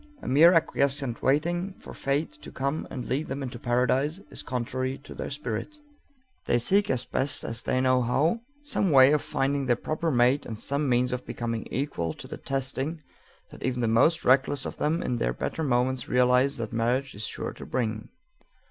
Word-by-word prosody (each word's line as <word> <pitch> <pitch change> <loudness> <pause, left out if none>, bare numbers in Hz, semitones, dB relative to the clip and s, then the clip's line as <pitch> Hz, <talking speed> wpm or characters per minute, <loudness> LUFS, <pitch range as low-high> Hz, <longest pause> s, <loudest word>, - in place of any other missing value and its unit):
A - - -6
mere 155 +6 +7
acquiescent 140 -6 +1
waiting 175 +8 +1
for - - -11
Fate 140 +3 -1
to - - -10
come 140 +3 -2
and 125 - -5
lead 140 +5 -1
them 140 +1 -4
into 125 -2 -6
paradise 130 +7 +1
is - - -5
contrary 130 +2 -3
to - - -10
their - - -5
spirit. 140 - -4 0.7
They - - +3
seek 200 - +2
as 125 -1 0
best 135 +1 -1 0.2
they 130 - +1
know 130 -1 +3
how 150 - +1 0.2
some 265 -9 0
way 135 -2 +7
of 150 -1 +3
finding 140 0 -1
their 120 - +4
proper 155 +6 -2
mate 125 +1 +3
and 110 - -6
some 140 +5 0
means 125 0 +2
of 125 0 -3
becoming 115 -1 -3
equal 120 - -2
to - - -10
the - - -7
testing 135 +4 -2 0.5
that - - -12
even 125 -1 -1
the 115 - +1
most 140 +9 +3
reckless 135 +1 +3
of - - -5
them 160 +3 0
in 125 - -1
their - - 0
better 160 - -3
moments 125 -2 0
realize 125 +2 +3
that 115 -1 -5
marriage 125 +4 0
is 105 +2 -4
sure - - -4
to - - -10
bring. 110 -3 -2
130 Hz, 190 wpm, -27 LUFS, 125-145 Hz, 0.7 s, mere